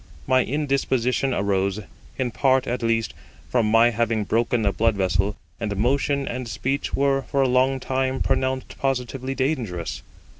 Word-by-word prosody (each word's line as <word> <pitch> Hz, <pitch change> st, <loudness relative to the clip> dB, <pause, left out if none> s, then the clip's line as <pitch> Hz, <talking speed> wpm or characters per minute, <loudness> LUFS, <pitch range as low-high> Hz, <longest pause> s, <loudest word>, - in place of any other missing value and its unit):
My 130 Hz, -1 st, +3 dB
indisposition 135 Hz, -2 st, 0 dB
arose, 100 Hz, -3 st, 0 dB, 0.4 s
in 125 Hz, -2 st, -1 dB
part 130 Hz, +1 st, +2 dB
at 125 Hz, +1 st, -2 dB
least, 115 Hz, -1 st, 0 dB, 0.4 s
from 115 Hz, -4 st, +2 dB
my 115 Hz, +2 st, +5 dB
having 115 Hz, -1 st, 0 dB
broken 115 Hz, +1 st, +1 dB
a 100 Hz, -, +2 dB
blood 115 Hz, -1 st, +2 dB
vessel; 95 Hz, +1 st, +1 dB, 0.2 s
and 105 Hz, -3 st, -3 dB
motion 140 Hz, +5 st, +1 dB
and 125 Hz, 0 st, -4 dB
speech 125 Hz, +7 st, -2 dB
were 135 Hz, 0 st, +2 dB
for 135 Hz, +1 st, 0 dB
a -, -, +3 dB
long 130 Hz, +1 st, +2 dB
time 130 Hz, 0 st, -1 dB
pronounced 130 Hz, 0 st, -1 dB
positively 135 Hz, 0 st, -2 dB
dangerous. 100 Hz, -, -2 dB
125 Hz, 150 wpm, -23 LUFS, 110-135 Hz, 0.4 s, my